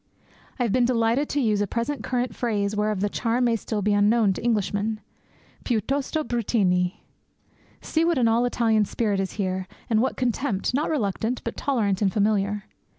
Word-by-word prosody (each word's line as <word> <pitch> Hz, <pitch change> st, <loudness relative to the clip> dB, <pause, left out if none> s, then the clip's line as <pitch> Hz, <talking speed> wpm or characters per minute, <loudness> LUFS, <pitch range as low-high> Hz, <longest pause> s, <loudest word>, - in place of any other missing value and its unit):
I 250 Hz, -, 0 dB
have 230 Hz, -, 0 dB
been 250 Hz, +3 st, +3 dB
delighted 235 Hz, +3 st, +1 dB
to 290 Hz, -, 0 dB
use 215 Hz, -6 st, +1 dB
a 205 Hz, -, 0 dB
present 235 Hz, +7 st, -2 dB
current 245 Hz, -2 st, -2 dB
phrase 210 Hz, -4 st, -1 dB
whereof 210 Hz, -2 st, 0 dB
the 205 Hz, -, +2 dB
charm 235 Hz, +4 st, 0 dB
may 235 Hz, -1 st, +3 dB
still 215 Hz, -1 st, -3 dB
be 210 Hz, +1 st, +2 dB
unknown 205 Hz, 0 st, +3 dB
to -, -, -7 dB
Englishmen 215 Hz, -1 st, 0 dB, 0.6 s
"piuttosto 275 Hz, +6 st, -1 dB
bruttini." 195 Hz, -7 st, 0 dB, 0.8 s
See 320 Hz, -, 0 dB
what 335 Hz, -2 st, +2 dB
an 240 Hz, -3 st, +3 dB
all 230 Hz, +2 st, +3 dB
Italian 225 Hz, -3 st, +2 dB
spirit 205 Hz, -1 st, -1 dB
is 190 Hz, -1 st, -2 dB
here, 185 Hz, -2 st, -2 dB, 0.2 s
and 220 Hz, -1 st, +4 dB
what 260 Hz, -, -1 dB
contempt, 245 Hz, -4 st, -1 dB
not 290 Hz, +4 st, 0 dB
reluctant, 230 Hz, -3 st, -1 dB
but 230 Hz, -, -4 dB
tolerant 215 Hz, -8 st, 0 dB
and 195 Hz, -2 st, +2 dB
familiar. 205 Hz, -1 st, +1 dB
225 Hz, 175 wpm, -25 LUFS, 205-245 Hz, 0.8 s, and